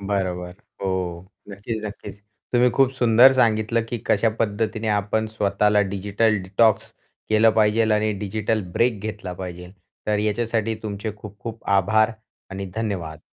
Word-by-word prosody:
बरोबर. 95 -3 -2 0.3
हो, 90 -2 -3 0.2
नक्कीच, 105 +2 -5
नक्कीच. 100 -1 -8 0.3
तुम्ही 125 0 +4
खूप 135 +2 +3
सुंदर 120 +1 +6
सांगितलं, 115 -2 +2
की 120 0 -4
कशा 110 +2 +3
पद्धतीने 110 0 -1
आपण 105 +1 0
स्वतःला 105 -1 +1
डिजिटल 105 +3 +1
डिटॉक्स 105 +3 +2 0.4
केलं 110 +1 +5
पाहिजे 110 0 +3
आणि 105 0 +1
डिजिटल 105 +2 -1
ब्रेक 115 -1 +1
घेतला 105 -3 -5
पाहिजे. 90 -1 -8 0.3
तर 105 -1 +1
याच्यासाठी 110 +1 0
तुमचे 105 0 -4
खूप-खूप 105 +2 -9
आभार 110 +4 +3 0.4
आणि 95 0 -5
धन्यवाद. 95 -9 -3
105 Hz, 130 wpm, -23 LUFS, 100-110 Hz, 0.4 s, सुंदर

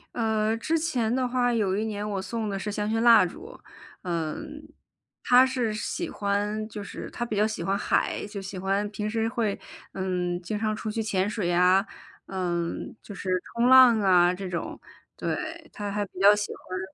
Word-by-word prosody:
呃， 220 -1 +1
之 320 +8 0
前 255 -9 0
的 260 0 +1
话 245 -1 +1
有 200 -4 +1
一 215 - -1
年 210 -1 -3
我 195 -2 -2
送 215 +2 -3
的 195 - -3
是 210 - -4
香 210 0 -2
薰 225 +1 0
蜡 230 -5 +7
烛。 375 - -9 0.4
嗯， 175 - -4 0.6
她 250 +1 +6
是 250 -4 -1
喜 215 - -3
欢 205 +1 -1
就 210 -1 -7
是 - - -7
她 240 - -3
比 220 -3 -4
较 210 +1 +3
喜 220 - -4
欢 195 +1 0
海， - - 0
就 205 -1 -6
喜 195 -1 -7
欢 195 +2 0
平 210 0 -4
时 225 0 0
会， 225 -3 -1 0.4
嗯， 180 -2 -2
经 205 +4 -4
常 215 0 0
出 215 0 -4
去 225 - -2
潜 200 -2 0
水 210 -4 -2
呀， 180 +3 +4 0.4
呃， 175 -3 -2 0.3
就 205 - -10
是 190 - -5 0.3
冲 235 +1 +3
浪 255 -4 +8
啊 180 -2 +5
这 185 0 -6
种， 170 - -4 0.4
对， 325 +1 -4
她 205 -1 -5
还 205 0 -1
比 185 - -12
较 200 +2 +7
喜 210 0 -3
欢 185 0 -7
210 Hz, 205 characters per minute, -26 LUFS, 190-230 Hz, 0.6 s, 浪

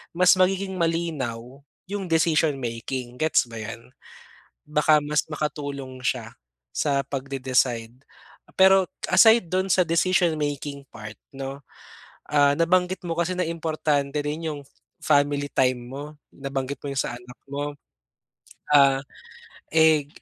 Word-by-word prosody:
mas 180 +1 +6
magiging 190 +1 +1
malinaw 140 -7 -2 0.3
yung 200 -1 -4
decision 160 -2 +2
making, 120 0 -5
gets 155 -3 +3
ba 115 -1 -8
'yan? 115 +3 -8 0.8
Baka 150 0 +3
mas 150 +1 0
makatulong 140 -3 -4
siya - - -2 0.4
sa 140 -2 +1
pagde-decide. 130 -4 -1 0.6
Pero 190 0 +6 0.3
aside 220 +2 +6
do'n 185 +1 +1
sa 185 - +4
decision 170 0 +2
making 145 -1 -4
part 110 0 -9 0.2
'no, 135 +1 -6 0.7
ah, 145 -1 +4
nabanggit 180 +2 +1
mo 165 - -1
kasi 170 +1 0
na 180 - +1
importante 155 -3 -1
rin 155 +2 -3
yung 145 -1 -7
f - - -25 0.3
family 145 -1 +2
time 130 -1 +2
mo, 140 +2 -6 0.3
nabanggit 135 0 -4
mo 145 - -5
yung 140 - -5
sa - - -4
anak 120 0 -14
mo, 145 +1 -3 1.0
ah, 140 -2 +6 0.7
eh, 160 -3 +4
145 Hz, 130 wpm, -24 LUFS, 135-165 Hz, 1.0 s, mas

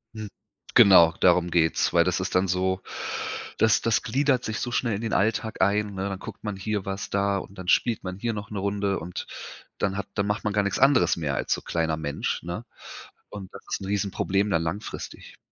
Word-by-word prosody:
Hm, 110 -1 -6 0.5
genau, 85 -4 +8
darum 90 -1 +4
geht's, 80 -2 +2
weil 85 - +5
das 90 +1 0
ist 95 0 -3
dann 90 +1 +3
so 95 +1 0 0.8
das 110 -1 +4
das 115 -1 +2
gliedert 130 +1 +1
sich 110 0 -3
so 120 - -3
schnell 120 -2 0
in 100 - -4
den 115 -1 -3
Alltag 110 +2 0
ein, 100 +2 +2
ne? 95 +1 -3
Dann 95 -1 -5
guckt - - -10
man 105 -2 -3
hier 100 0 -3
was 95 0 -4
da 100 0 +1
und 95 0 -8
dann 95 -1 -8
spielt 115 +4 +2
man 95 0 -5
hier 115 +3 -2
noch 105 -1 -6
'ne 105 - -3
Runde 100 0 -1
und 85 +2 -6 0.5
dann 100 -2 -1
hat 100 - -4
dann 100 - 0
macht 105 0 -1
man 105 - -1
gar 105 0 +2
nix 100 -1 -1
anderes 135 0 +4
mehr 75 -4 -2
als - - 0
so - - -3
kleiner 80 -2 -1
Mensch, 75 -2 -3
ne? 85 +7 -5 0.6
Und 100 -3 -9
das - - -10
ist - - -2
'n - - -5
Riesenproblem 100 0 0
dann 85 -4 +1
langfristig. 85 +6 -6
100 Hz, 215 wpm, -26 LUFS, 90-105 Hz, 0.8 s, genau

